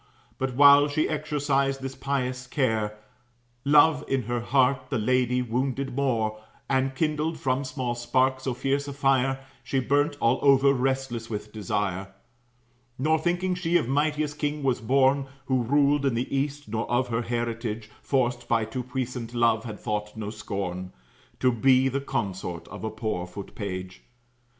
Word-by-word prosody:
But 130 -1 -2
while 145 +1 +8
she 150 +2 0
exercised 145 -3 0
this 135 0 -4
pious 130 -2 -2
care, 110 -6 0 0.7
Love 150 +1 +5
in 135 -2 0
her 120 +2 -2
heart 130 +1 +2
the 135 - 0
lady 125 +2 +1
wounded 130 +2 -2
more, 115 -6 0 0.3
And 130 0 +1
kindled 155 +2 0
from 130 +1 0
small 130 -2 -3
spark 130 +2 +1
so 130 -1 -3
fierce 140 +3 -1
a 140 - -5
fire, 135 -1 +1 0.2
She 135 - 0
burnt 145 +3 +1
all 115 +3 +2
over, 140 0 +5
restless 130 -3 -1
with 105 -1 -5
desire; 100 -2 -2 0.9
"Nor 155 +4 +2
thinking 180 +3 0
she 175 -1 +1
of 155 - -1
mightiest 150 +2 0
king 150 0 -2
was 130 -3 +1
born, 135 +3 +3 0.2
Who 130 -2 +1
ruled 140 +3 +3
in 135 -4 +1
the 125 +3 -2
East, 145 +1 -2
nor 110 +2 -3
of 125 +1 +1
her 115 0 0
heritage, 115 -2 -3
Forced 120 -3 0
by 115 -2 +2
too 120 +4 -4
puissant 125 -1 -4
love, 115 -1 +2
had 105 -3 -6
thought 105 0 -3
no 105 -1 -4
scorn 95 -4 -5 0.5
To 130 - +4
be 130 +2 +4
the 135 +1 -2
consort 95 -9 -4
of - - -9
a 110 - -1
poor 110 -5 -3
foot 95 +2 -9
page." 95 -2 -6
130 Hz, 160 wpm, -26 LUFS, 115-140 Hz, 0.9 s, while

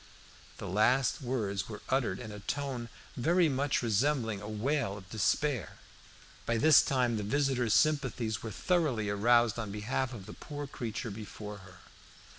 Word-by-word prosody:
The - - -6
last 120 +10 +2
words 105 -7 -2
were 105 -2 -8
uttered 125 -8 +1
in 110 -3 -7
a 105 - -8
tone 125 +1 -3 0.3
very 170 +7 +3
much 135 -2 0
resembling 115 -1 +1
a 105 - -7
wail 115 -1 -1
of 95 -2 -12
despair. 115 - 0 0.7
By 115 - +1
this 155 +6 +7
time 125 -4 +1
the - - -2
visitor's 125 -1 +1
sympathies 130 -8 +1
were 115 - -5
thoroughly 130 - 0
aroused 120 +2 +3
on 110 -3 -3
behalf 120 +5 -2
of 105 -7 -8
the - - -9
poor 145 -1 -7
broken 135 - -15
creature 115 0 -4
before 105 0 -8
her. 95 -2 -15
120 Hz, 160 wpm, -31 LUFS, 105-135 Hz, 0.7 s, this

